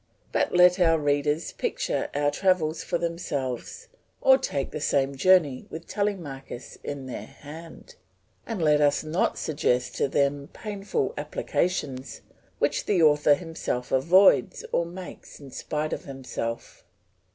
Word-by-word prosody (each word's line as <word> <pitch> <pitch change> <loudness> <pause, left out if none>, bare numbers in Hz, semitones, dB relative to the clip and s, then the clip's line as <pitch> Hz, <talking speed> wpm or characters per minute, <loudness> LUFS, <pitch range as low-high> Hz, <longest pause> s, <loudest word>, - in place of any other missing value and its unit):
But - - +1
let 180 +1 +6
our 165 -2 +4
readers 145 +1 0
picture - - -2
our 145 0 +2
travels 170 -4 +1
for 175 - -1
themselves, 170 - -4 0.3
or 265 - +6
take 140 - -2
the 155 - -5
same 140 -1 +1
journeys 150 -4 +3
with 165 +1 -8
Telemachus 160 -12 -4
in 140 -2 -5
their 130 - -6
hand; 160 - -12 0.5
and 225 -4 -3
let 150 -1 +4
us 145 0 +3
not 155 +4 0
suggest 125 -5 0
to - - +2
them 140 +1 0
painful 200 -9 -3
applications 145 -2 -2 0.4
which - - 0
the 180 -5 +3
author 150 -1 +5
himself 160 -7 -4
avoids 180 +7 +4
or 170 - +1
makes 180 +1 -10
in 140 -2 -12
spite 155 +3 -3
of - - -5
himself. 130 -4 -6
150 Hz, 135 wpm, -26 LUFS, 140-180 Hz, 0.5 s, let